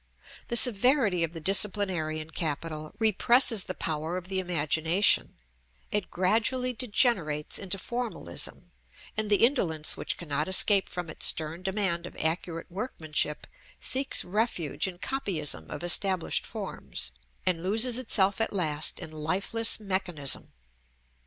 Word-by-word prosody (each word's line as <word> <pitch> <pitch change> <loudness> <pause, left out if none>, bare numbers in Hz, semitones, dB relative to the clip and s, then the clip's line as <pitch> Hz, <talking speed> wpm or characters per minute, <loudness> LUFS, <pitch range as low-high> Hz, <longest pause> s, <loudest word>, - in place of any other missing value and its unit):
The 235 - +3
severity 230 - +4
of 165 0 -2
the 165 - -7
disciplinarian 175 -4 +1
capital 155 -1 -4
represses 225 0 +4
the 185 - -4
power 160 +2 -2
of 185 0 -8
the 190 -1 -1
imagination; 165 +1 +1 0.6
it 205 -2 -2
gradually 230 +7 0
degenerates 210 - 0
into 195 0 -3
Formalism; 240 +3 -4 0.4
and 215 -1 -2
the 205 +2 +5
indolence 165 - 0
which - - -4
cannot 150 -2 -3
escape 195 +1 +3
from 180 -1 -5
its 155 - +3
stern 160 +2 -1
demand 190 -3 -1
of - - -13
accurate 165 +1 -3
workmanship, 160 -7 -3 0.3
seeks 265 +1 +2
refuge 190 - -1
in 180 -2 -7
copyism 185 - -2
of 150 - -7
established 185 +1 +2
forms, - - -5 0.3
and 175 -3 +1
loses 225 +6 +3
itself 205 -4 +1
at 225 - 0
last 155 -6 +1
in 155 - -8
lifeless 185 +10 +1
mechanism. 185 -8 -1
185 Hz, 125 wpm, -27 LUFS, 160-215 Hz, 0.6 s, the